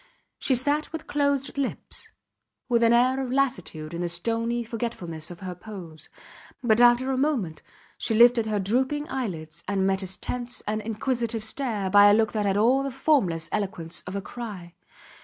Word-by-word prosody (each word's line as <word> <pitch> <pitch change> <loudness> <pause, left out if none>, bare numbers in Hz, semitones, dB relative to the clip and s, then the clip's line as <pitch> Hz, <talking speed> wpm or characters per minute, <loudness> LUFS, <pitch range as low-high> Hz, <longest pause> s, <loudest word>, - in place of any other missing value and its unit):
She 265 - +2
sat 290 +5 +1
with 320 -1 -6
closed 285 -1 0
lips, 275 - -3 0.6
with 235 -2 +2
an 230 0 +5
air 255 +3 +3
of 250 - -4
lassitude 250 - -1
in 170 - -3
the 175 - -1
stony 230 +7 -1
forgetfulness 215 -9 -5
of 175 0 -10
her 185 -1 -5
pose, 175 -5 -10 0.5
but 230 -1 +4
after 245 +2 +5
a 260 - 0
moment 245 - -1 0.4
she 225 - 0
lifted 235 0 +6
her 215 -1 0
drooping 260 +9 0
eyelids 165 -12 -4
and 195 -1 +1
met 190 0 +1
his 190 0 -3
tense 245 0 -5
and 215 +1 -1
inquisitive 230 0 -2
stare 220 -4 -2
by 205 +1 +8
a 205 - +6
look 220 -1 +2
that 210 -2 -1
had 195 0 +1
all 245 +6 +4
the 275 - -2
formless 245 - +1
eloquence 190 -5 -2
of 180 - -5
a 200 - -3
cry. 200 -8 -8
225 Hz, 175 wpm, -26 LUFS, 190-255 Hz, 0.6 s, by